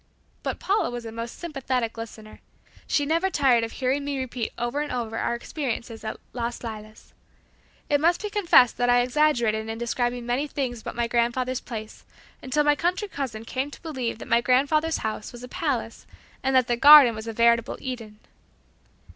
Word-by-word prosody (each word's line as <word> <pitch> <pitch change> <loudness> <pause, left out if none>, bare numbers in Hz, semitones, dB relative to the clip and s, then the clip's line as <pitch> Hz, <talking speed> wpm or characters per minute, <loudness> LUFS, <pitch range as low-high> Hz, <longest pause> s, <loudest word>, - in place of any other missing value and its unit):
But - - -3
Paula 400 +3 0
was 240 -1 -6
a 225 - -6
most 230 +1 -6
sympathetic 260 -8 -2
listener. 220 -1 -9 0.5
She 290 - +1
never 330 +5 +1
tired 265 -9 +3
of 225 - -4
hearing 270 +2 -1
me 285 -1 -3
repeat 250 -3 -3
over 240 +5 -2
and 300 - -4
over 235 -3 -3
our 235 - 0
experiences 235 -3 -5
at 220 - -4 0.2
"Las 240 0 -4
Lilas." 215 -1 -9 0.7
It 290 -1 +2
must 340 +2 +3
be 420 - -3
confessed 340 - +5
that 245 0 +1
I 245 0 +5
exaggerated 245 -5 +1
in 225 - -4
describing 240 +1 -2
many 250 +5 -1
things 255 -5 -3
about - - -7
my 235 0 0
grandfather's 240 +2 0
place, 220 -2 -8 0.4
until 290 +3 +1
my 295 0 +4
country 360 +6 -1
cousin 245 - -5
came 265 +4 -3
to - - -13
believe 260 -9 -3
that - - -9
my 235 - +3
grandfather's 285 +6 +2
house 215 -1 -4
was 240 0 -11
a - - -7
palace 250 -6 -3 0.3
and 265 0 0
that 255 -1 +5
the 240 0 0
garden 285 -2 +9
was 220 +1 -7
a 225 - -4
veritable 235 0 +2
Eden. 230 -5 -6
245 Hz, 185 wpm, -25 LUFS, 230-285 Hz, 0.7 s, garden